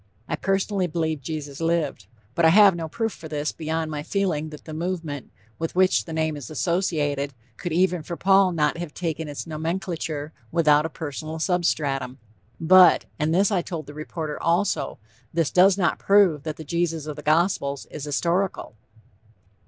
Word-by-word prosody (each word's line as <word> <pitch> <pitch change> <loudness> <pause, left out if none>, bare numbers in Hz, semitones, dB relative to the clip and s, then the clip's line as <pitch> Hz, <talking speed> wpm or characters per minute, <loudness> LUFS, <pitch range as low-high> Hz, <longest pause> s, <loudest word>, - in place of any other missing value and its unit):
I - - -1
personally 195 -1 0
believe 160 -2 -2
Jesus 145 0 -6
lived. 165 - -1 0.3
But 170 - 0
I 160 - +7
have 200 +1 +7
no 165 -2 -4
proof 225 +5 -2
for 160 - -10
this 150 -1 -2
beyond 160 0 -3
my 150 -1 -3
feeling 165 -3 -1
that 150 -1 -11
the 155 - -8
movement 165 -4 -4 0.3
with 165 +1 -3
which 185 0 +3
the 165 - -8
name 160 -1 -1
is 140 -6 -8
associated 150 -4 -1 0.2
could 175 - -5
even 180 +1 +2
for 170 +2 -6
Paul 195 0 +4
not 155 -1 0
have 175 -4 -6
taken 160 -2 -3
its 145 -1 -6
nomenclature 160 -2 -4 0.2
without 155 -2 +4
a - - -11
personal 155 0 -6
substratum. 150 -7 0 0.4
But, 180 +2 +6
and 155 +1 +1
this 195 +5 +3
I 190 -3 +2
told 165 -3 -6
the 145 - -10
reporter 155 0 -5
also, 180 +4 0 0.3
this 165 -2 0
does 190 +2 +5
not 170 -5 +1
prove 195 -7 +4
that 155 -1 -3
the 160 - -7
Jesus 165 0 -1
of 150 -1 -5
the 150 - -8
Gospels 155 -3 +1
is 150 - -7
historical." 170 - -1
160 Hz, 175 wpm, -24 LUFS, 150-180 Hz, 0.4 s, I